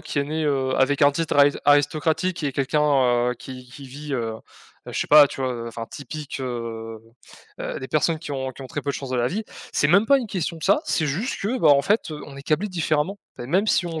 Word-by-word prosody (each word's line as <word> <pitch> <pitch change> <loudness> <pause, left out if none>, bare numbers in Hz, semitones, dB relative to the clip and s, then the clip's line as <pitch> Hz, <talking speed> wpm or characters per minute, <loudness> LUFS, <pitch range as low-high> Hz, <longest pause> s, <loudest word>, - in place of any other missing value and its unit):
qui 155 -3 -4
est 140 - +1
né, 155 +2 -3
heu, 135 -3 0
avec 135 +2 +2
un 145 0 +6
titre 160 -1 -1
ari 145 0 +6
aristocratique 155 +4 +2
et 145 - 0
quelqu'un, 130 -4 +2
heu, - - -3
qui 130 -1 -9
qui 135 +1 -11
vit, 145 +2 -8
heu 115 -3 -2 0.5
heu, - - -7
je - - -3
sais - - -1
pas, 150 -1 +8
tu 135 - -6
vois? 130 -1 0
Heu, 115 -1 -6
enfin 115 0 -6
typique, 145 0 -7
heu 115 -3 -5 0.6
heu, - - -4
des 130 - -6
personnes 155 +1 +1
qui 155 -2 -7
ont 130 -1 -3
qui 130 +1 -11
ont - - -7
très 145 - -4
peu 140 - -1
de - - -4
chance 135 -2 -7
dans 130 - -1
la 120 0 +1
vie. 215 +7 -3 0.3
C'est 145 - +2
même 200 +7 +5
pas 275 +1 +5
une 240 - -4
question 175 -4 -3
de 160 - -12
ça, 200 +10 +4
c'est 160 - 0
juste 190 - -2
que 235 +6 -1
bah, - - +4
en 140 -1 +6
fait, 205 +3 +1
heu, 150 - -6
on 140 -1 -11
est 140 - -9
câblés 160 +9 0
différemment. 165 +2 -1 0.2
Bah, 120 - -7
même 190 +9 +1
si 175 - +2
on 165 -2 -4
145 Hz, 265 wpm, -23 LUFS, 130-160 Hz, 0.6 s, pas